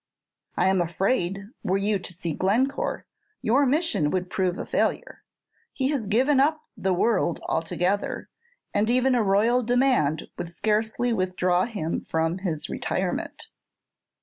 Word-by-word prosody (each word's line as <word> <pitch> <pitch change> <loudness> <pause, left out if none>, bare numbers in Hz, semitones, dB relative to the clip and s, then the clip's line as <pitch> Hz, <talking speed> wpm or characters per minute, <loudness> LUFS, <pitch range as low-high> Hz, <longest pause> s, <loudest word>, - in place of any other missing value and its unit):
"I - - +3
am 190 -1 +3
afraid, 190 +2 0 0.2
were 190 +2 +1
you 200 0 0
to 180 - -9
see 170 -2 -3
Glencore, 235 - 0 0.4
your 265 +5 +3
mission 295 - +1
would 180 +2 -2
prove 185 -1 0
a - - -4
failure. - - -1 0.5
He 265 -1 0
has 270 -8 -1
given 260 +7 +3
up 310 +3 +2
the 190 - -1
world 185 -2 +1
altogether, 180 +4 -1 0.5
and 210 +2 +1
even 255 +2 +3
a 245 - +3
royal 220 +5 +3
command 245 - +2
would 170 - -4
scarcely 220 +5 0
withdraw 185 -2 +1
him 200 -9 -4
from 165 +3 0
his 165 -6 -3
retirement." - - -3
200 Hz, 140 wpm, -25 LUFS, 180-245 Hz, 0.5 s, I